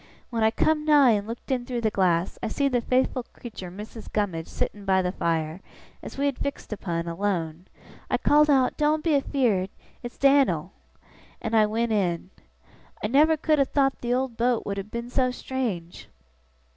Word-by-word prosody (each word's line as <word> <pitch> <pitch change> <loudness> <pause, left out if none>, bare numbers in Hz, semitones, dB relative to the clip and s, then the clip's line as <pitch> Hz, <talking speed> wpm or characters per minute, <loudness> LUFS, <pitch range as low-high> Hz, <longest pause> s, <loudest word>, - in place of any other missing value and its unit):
When 230 -2 0
I 220 - +5
come 300 +7 +1
nigh 295 -5 +6
and 205 -1 0
looked 230 +4 -7
in 250 -2 0
through 240 -1 -3
the 220 -2 +1
glass, 180 -3 +1
I 230 - -2
see 280 +6 0
the 250 -3 +1
faithful 255 +1 +1
creetur 220 -6 -10
Missis 210 +4 -9
Gummidge 185 -6 -2
sittin' 205 - -4
by 190 -1 +2
the 180 - 0
fire, 165 -1 -2 0.4
as - - -9
we 280 - 0
had 280 -3 -1
fixed 280 -5 -4
upon, 170 -5 -3
alone. 170 -2 -2 0.4
I - - +2
called 300 +1 +4
out, 265 -3 +3
"Doen't 305 +1 +1
be 330 - +1
afeerd! 245 -9 +1 0.3
It's 240 -1 -8
Dan'l!" 275 0 +3 0.7
and 225 0 -2
I 215 -1 +5
went 225 +2 -1
in. 185 -3 -1 0.7
I - - +1
never 300 +8 +4
could 305 0 +2
have 275 - +2
thowt 270 -2 +2
the 240 - -2
old 255 -2 -2
boat 240 0 +1
would 200 0 -3
have 195 +1 -5
been 235 +2 -5
so 255 -1 +2
strange! 240 -10 -4
230 Hz, 185 wpm, -25 LUFS, 195-270 Hz, 0.7 s, nigh